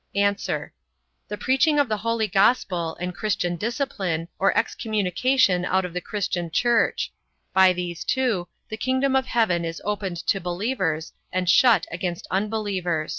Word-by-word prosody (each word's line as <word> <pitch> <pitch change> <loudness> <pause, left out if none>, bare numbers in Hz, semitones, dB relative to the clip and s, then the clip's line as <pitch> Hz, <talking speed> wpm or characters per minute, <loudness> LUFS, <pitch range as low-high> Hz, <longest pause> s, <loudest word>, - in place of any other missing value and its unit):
A. 200 - +3 1.0
The 210 - -5
preaching 280 +4 +3
of 285 -2 +3
the 215 -2 -1
holy 225 +1 0
gospel, 190 -4 +1
and 180 +1 -3
christian 180 -3 -1
discipline, 195 - -2
or 195 - +4
excommunication 210 -1 +1
out 185 +1 +1
of 180 - -7
the 180 - -3
christian 180 -4 -3
church; 235 +8 +1 0.4
by 190 0 +6
these 175 -1 -4
two, 235 -9 0 0.2
the 220 - -5
kingdom 260 +2 +1
of 265 -1 +1
heaven 215 -9 +1
is 165 0 -4
opened 200 -4 -2
to 195 - +1
believers, 175 -3 -2 0.2
and 185 -1 -1
shut 220 -2 +5
against 175 0 -4
unbelievers. 190 -6 -1
195 Hz, 145 wpm, -24 LUFS, 175-230 Hz, 1.0 s, by